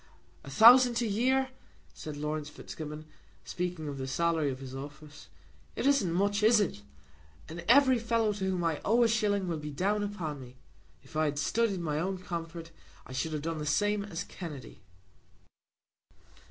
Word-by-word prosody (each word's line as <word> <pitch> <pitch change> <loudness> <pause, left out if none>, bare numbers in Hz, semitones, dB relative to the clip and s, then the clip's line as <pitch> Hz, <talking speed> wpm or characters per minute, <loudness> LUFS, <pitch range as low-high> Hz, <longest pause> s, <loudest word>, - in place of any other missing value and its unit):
"A - - -10
thousand 240 - +7
a - - 0
year!" 260 +5 +1 0.4
said 155 -2 -7
Laurence 150 0 -3
Fitzgibbon, 150 0 -8 0.4
speaking 175 -3 -4
of 140 -1 -5
the 130 - -4
salary 160 +1 +1
of 130 - -4
his 130 -1 -9
office. 145 +2 -10 0.5
"It - - -3
isn't 275 -11 +3
much; 200 +4 +1
is 220 +1 +5
it? 195 - -1 0.7
And 170 +2 -8
every 260 -1 +6
fellow 230 -2 +1
to 195 -2 -4
whom 180 -2 -1
I 165 -3 -1
owe 235 +3 +3
a - - +5
shilling 205 -4 +1
will 165 -3 -2
be 150 0 -6
down 195 +8 0
upon 170 -9 -4
me. 125 0 -13 0.5
If - - -17
I 155 0 +2
had 145 -1 -2
studied 205 +3 0
my 150 -2 -1
own 190 +3 -2
comfort, 170 -2 -6 0.3
I 130 - -10
should 155 +5 -2
have 150 -1 -3
done 165 -1 -3
the 150 - -4
same 205 +6 +1
as 180 -4 -5
Kennedy." 150 - -9
170 Hz, 175 wpm, -30 LUFS, 150-210 Hz, 0.7 s, thousand